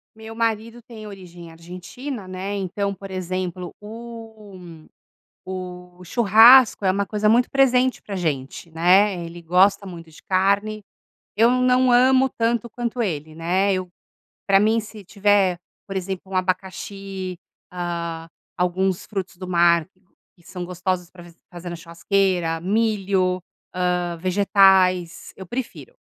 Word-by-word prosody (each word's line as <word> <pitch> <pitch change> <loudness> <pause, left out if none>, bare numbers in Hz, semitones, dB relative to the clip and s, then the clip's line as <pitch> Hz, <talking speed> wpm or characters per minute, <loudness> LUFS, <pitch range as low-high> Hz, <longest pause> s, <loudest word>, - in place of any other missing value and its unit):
Meu 220 0 -10
marido 230 +1 -2
tem 220 -2 -11
origem 175 -4 -11
argentina, 185 - -8
né? 185 +2 -5
Então, 200 +1 -2
por 195 +1 -10
exemplo, 185 -1 -4
o 215 -6 -11 0.6
o 180 -1 -8
churrasco 230 +4 +6
é 185 - +3
uma 200 +1 -1
coisa 210 +1 0
muito 240 +2 +3
presente 260 -1 +2
pra 200 -2 -6
gente, 150 -1 -4
né? 180 +3 +3
Ele 170 +1 -10
gosta 195 +4 +3
muito 165 -3 -10
de 155 - -16
carne, 200 +3 0 0.5
eu 230 +2 +5
não 255 0 +3
amo 260 +2 +5
tanto 235 0 -1
quanto 240 +1 -4
ele, 155 -7 -3
né? 185 +4 +1
Eu 185 -1 -3 0.6
pra 195 0 +5
mim, 220 +2 +2
se 210 -1 -11
tiver, 200 -2 +2 0.3
por 195 - -6
exemplo, 190 0 -5
um - - -4
abacaxi, 190 0 -4 0.3
ah, 170 -2 -5 0.3
alguns 185 +1 0
frutos 190 -3 -5
do 185 -1 -8
mar 170 -1 +3 0.5
que 170 - -25
são 180 0 -7
gostosos 180 0 -3
para 175 -2 -13
f 170 -1 -16 0.2
fazer 175 0 -8
na 175 - -5
churrasqueira, 170 0 -1
milho, 195 -3 0 0.3
ah, 180 -1 -1
vegetais, 185 -1 +3
eu 190 -2 -9
prefiro. 260 - -6
190 Hz, 135 wpm, -22 LUFS, 180-215 Hz, 0.6 s, churrasco